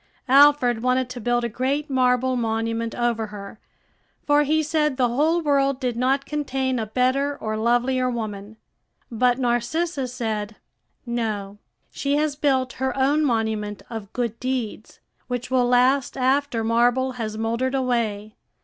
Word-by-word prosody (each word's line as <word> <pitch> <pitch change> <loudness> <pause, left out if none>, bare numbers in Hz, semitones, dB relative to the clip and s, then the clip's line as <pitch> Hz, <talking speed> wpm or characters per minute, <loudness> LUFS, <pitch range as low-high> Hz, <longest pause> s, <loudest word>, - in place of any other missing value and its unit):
Alfred 275 -4 +5
wanted 255 0 +1
to 245 -1 -7
build 240 +2 +1
a - - 0
great 265 +6 -2
marble 255 -1 +2
monument 230 0 -2
over 235 -2 0
her; 205 0 -10 0.7
for 290 0 +4
he 310 +2 +1
said 300 -2 0
the 250 -2 +2
whole 310 +8 +2
world 275 -3 +1
did 250 -3 -2
not 265 +3 +1
contain 265 -4 -2
a 220 - -3
better 260 +5 0
or 215 -1 -3
lovelier 245 +3 +1
woman. 215 -3 -5 0.5
But 245 +1 +2
Narcissa 260 +4 -1
said, 220 -4 -4 0.5
"No; 215 -4 -3 0.3
she 280 0 -1
has 300 -1 0
built 265 -3 +1
her 265 +1 -1
own 285 +3 +2
monument 220 -5 -1
of 220 -3 -7
good 235 -2 -3
deeds, 250 -4 -4 0.3
which 245 0 -4
will 250 -2 +3
last 255 +2 +2
after 260 -2 +1
marble 240 +3 +2
has 215 -1 -4
mouldered 235 +4 -1
away. 225 -5 -1
250 Hz, 145 wpm, -23 LUFS, 225-270 Hz, 0.7 s, Alfred